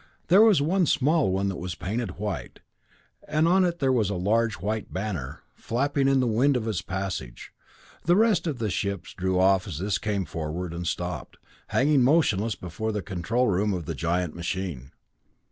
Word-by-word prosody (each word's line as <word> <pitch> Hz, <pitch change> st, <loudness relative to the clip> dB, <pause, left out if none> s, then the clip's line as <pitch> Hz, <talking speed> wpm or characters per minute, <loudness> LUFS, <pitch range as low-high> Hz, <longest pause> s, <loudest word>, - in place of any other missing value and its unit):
There 190 Hz, +4 st, +7 dB
was 210 Hz, -10 st, +5 dB
one 180 Hz, +2 st, +2 dB
small 150 Hz, -, +2 dB
one 95 Hz, +1 st, 0 dB
that 95 Hz, -, -4 dB
was 90 Hz, -1 st, -4 dB
painted 105 Hz, +1 st, -4 dB
white, 105 Hz, 0 st, -5 dB, 0.7 s
and 155 Hz, +2 st, +2 dB
on 185 Hz, +2 st, +4 dB
it 175 Hz, -1 st, 0 dB
there 135 Hz, -4 st, +1 dB
was 115 Hz, -6 st, +2 dB
a 100 Hz, -, -2 dB
large 110 Hz, +4 st, +1 dB
white 105 Hz, +4 st, -3 dB
banner, 90 Hz, -9 st, -4 dB
flapping 140 Hz, +3 st, 0 dB
in 135 Hz, -1 st, +4 dB
the 130 Hz, -, +2 dB
wind 125 Hz, +4 st, +3 dB
of 115 Hz, -2 st, -3 dB
its 100 Hz, -6 st, -1 dB
passage. 95 Hz, -10 st, -5 dB, 0.5 s
The 175 Hz, -, +4 dB
rest 210 Hz, -5 st, +3 dB
of 150 Hz, -5 st, -2 dB
the 110 Hz, -4 st, -2 dB
ships 100 Hz, -1 st, -3 dB
drew 95 Hz, 0 st, 0 dB
off 95 Hz, 0 st, +3 dB
as 85 Hz, -7 st, -5 dB
this 95 Hz, +3 st, -1 dB
came 100 Hz, -3 st, -1 dB
forward, 85 Hz, +2 st, -4 dB
and 85 Hz, 0 st, -4 dB
stopped, 90 Hz, +1 st, -4 dB, 0.3 s
hanging 140 Hz, 0 st, +3 dB
motionless 115 Hz, -, +2 dB
before 90 Hz, +6 st, -4 dB
the 105 Hz, -2 st, -3 dB
control 105 Hz, +8 st, 0 dB
room 100 Hz, +1 st, +1 dB
of 85 Hz, -3 st, -5 dB
the -, -, -3 dB
giant 85 Hz, 0 st, -1 dB
machine. 85 Hz, -6 st, -4 dB
105 Hz, 185 wpm, -26 LUFS, 90-135 Hz, 0.7 s, There